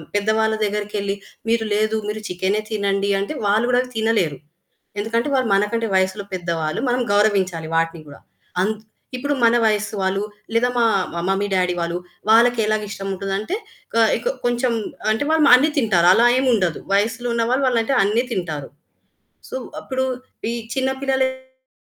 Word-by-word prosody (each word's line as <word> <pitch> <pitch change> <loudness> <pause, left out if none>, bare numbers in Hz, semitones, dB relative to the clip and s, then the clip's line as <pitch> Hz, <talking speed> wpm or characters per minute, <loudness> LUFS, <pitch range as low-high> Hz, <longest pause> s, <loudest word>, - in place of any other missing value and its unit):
పెద్దవాళ్ళ 220 +1 +2
దగ్గరికెళ్లి, 205 -1 -2 0.3
మీరు 225 0 +1
లేదు, 215 +1 +1
మీరు 215 +1 -3
చికెనే 190 +3 0
తినండి 200 -1 0
అంటే, 200 +9 -3
వాళ్ళు 215 +3 +3
కూడా 245 0 +4 0.2
తినలేరు. 220 -10 +1 0.6
ఎందుకంటే 230 +5 -1
వాళ్ళు 260 -3 +1
మనకంటే 210 +3 +1
వయసులో 190 +2 +1
పెద్దవాళ్ళు, 165 -3 -2
మనం 245 +1 +1
గౌరవించాలి 190 -6 +1
వాటిని 165 0 0
కూడా. 140 - -13 0.4
అంత్ 215 +2 -2 0.3
ఇప్పుడు 285 +3 -1
మన 230 +1 +5
వయసు 215 0 0
వాళ్ళు, 190 +1 0 0.3
లేదా 235 +2 +3
మా 235 - +4 0.3
మా 170 - -2
మమ్మీ 195 +1 0
డాడీ 180 -1 +1
వాళ్ళు, 170 0 -2 0.3
వాళ్ళకి 235 +1 +5
ఎలా 215 0 +2
ఇష్టం 195 -1 -5
ఉంటుంది 195 +1 -3
అంటే, 330 - -3 0.4
కాయ్‌ 225 -1 +3
కొ - - +3
కొంచెం 240 +1 +1 0.4
అంటే 220 +6 -1
వాళ్ళు 315 -2 +4
అన్ని 285 +5 +4
తింటారు. 195 -9 +3
అలా 230 +5 +5
ఏమి 260 0 +1
ఉండదు. 180 -7 0
వయసులో 225 +4 +1
ఉన్న 230 0 +1
వాళ్ళు 255 -2 +2
అంటే 270 +5 0
అన్ని 215 +5 +1
తింటారు. 160 -8 -3 0.8
సో, - - -7
వ్ - - -10
అప్పుడు 260 0 -2 0.5
ఈ - - -2 0.2
చిన్న 265 0 +1
పిల్లలకి 260 -1 -2
215 Hz, 160 wpm, -21 LUFS, 195-240 Hz, 0.8 s, మన